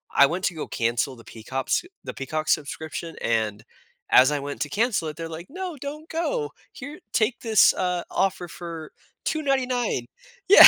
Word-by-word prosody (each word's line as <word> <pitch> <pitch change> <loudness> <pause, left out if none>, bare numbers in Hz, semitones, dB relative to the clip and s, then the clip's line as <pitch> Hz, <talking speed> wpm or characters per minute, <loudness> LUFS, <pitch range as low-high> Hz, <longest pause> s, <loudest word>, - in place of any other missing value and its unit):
I 140 - +8
went 180 +5 -1
to - - +1
go 155 - -3
cancel 120 +3 0
the 115 - -14
Peacops 130 - -1 0.2
the - - -4
Peacock 155 +3 -3
subscription, 160 +2 -1
and 110 -3 0 0.5
as 130 +3 +8
I 145 - +1
went 140 0 -5
to 150 - 0
cancel 205 - +1
it, 150 - -8
they're 165 -1 -4
like, 165 +2 -7
"No, 365 +1 -4
don't 295 +4 -6
go. 435 +7 -1 0.2
Here, 285 +3 -8
take 225 +2 +2
this," 220 -3 +6
uh, 180 -1 0
"offer 190 -2 +1
for 165 -2 -7 0.3
2.99." 265 -5 +1 0.4
Yeah. 405 - +13
170 Hz, 170 wpm, -26 LUFS, -, 0.5 s, Yeah